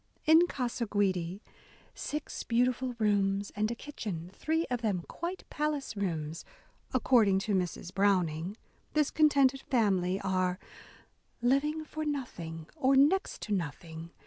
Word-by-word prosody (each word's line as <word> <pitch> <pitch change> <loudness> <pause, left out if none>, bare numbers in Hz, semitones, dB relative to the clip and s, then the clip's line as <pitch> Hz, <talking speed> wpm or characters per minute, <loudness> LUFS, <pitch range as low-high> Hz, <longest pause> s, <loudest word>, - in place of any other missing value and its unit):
In 320 +3 +7
Casa 245 -5 -2
Guidi, 190 -2 0 0.2
— - - -27
"six 300 0 -4
beautiful 250 +1 +1
rooms 200 -2 +1
and 210 +1 +1
a 235 - -2
kitchen, 200 - -6
three 320 +8 0
of 245 -2 -2
them 200 -6 0
quite 350 +3 -5
palace 295 -5 -2
rooms," 165 -5 -3 0.5
according 235 -6 +4
to 200 +2 -1
Mrs. 180 -1 -2
Browning, 185 -2 +1 0.2
— - - -37
this 300 -1 +3
contented 280 -3 +4
family 195 -6 +1
are 185 -1 0 0.9
"living 300 +5 +2
for 310 +1 -5
nothing 170 - -4
or 275 -3 +3
next 300 +9 +3
to 210 - -2
nothing 165 -1 -4
215 Hz, 135 wpm, -31 LUFS, 185-275 Hz, 0.9 s, In